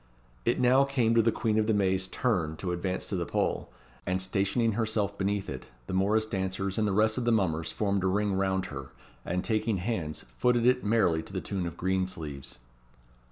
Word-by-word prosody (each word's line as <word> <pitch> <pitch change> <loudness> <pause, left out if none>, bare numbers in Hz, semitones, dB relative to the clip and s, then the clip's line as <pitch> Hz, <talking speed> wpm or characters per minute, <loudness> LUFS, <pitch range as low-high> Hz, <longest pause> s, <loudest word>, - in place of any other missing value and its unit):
It - - +2
now 130 +2 +5
came 130 -5 +1
to 115 - +5
the 115 +1 +3
Queen 110 -1 +1
of 110 - +1
the 110 - +3
May's 95 -1 +1
turn 90 -10 0
to 90 +1 -3
advance 90 +1 -2
to - - -3
the - - 0
pole, - - -1 0.3
and 90 0 0
stationing 100 +5 +1
herself 110 -2 0
beneath 100 0 -1
it, - - -6 0.2
the - - -6
morrice 105 +4 +2
dancers 95 -1 -2
and 105 - +2
the - - +1
rest 110 +4 +2
of - - -2
the 120 - +3
mummers 80 -7 +1
formed 100 -2 0
a - - +2
ring 100 +1 +1
round 95 -1 0
her, 70 -1 -6 0.3
and, 90 +2 -2
taking 110 -2 0
hands, 90 -6 -3
footed 120 -1 +3
it 125 0 +4
merrily 105 -7 +2
to - - -11
the - - -1
tune 95 -3 -3
of 85 - -7
"Green 95 0 0
Sleeves." 75 -6 -7
100 Hz, 205 wpm, -29 LUFS, 95-110 Hz, 0.3 s, now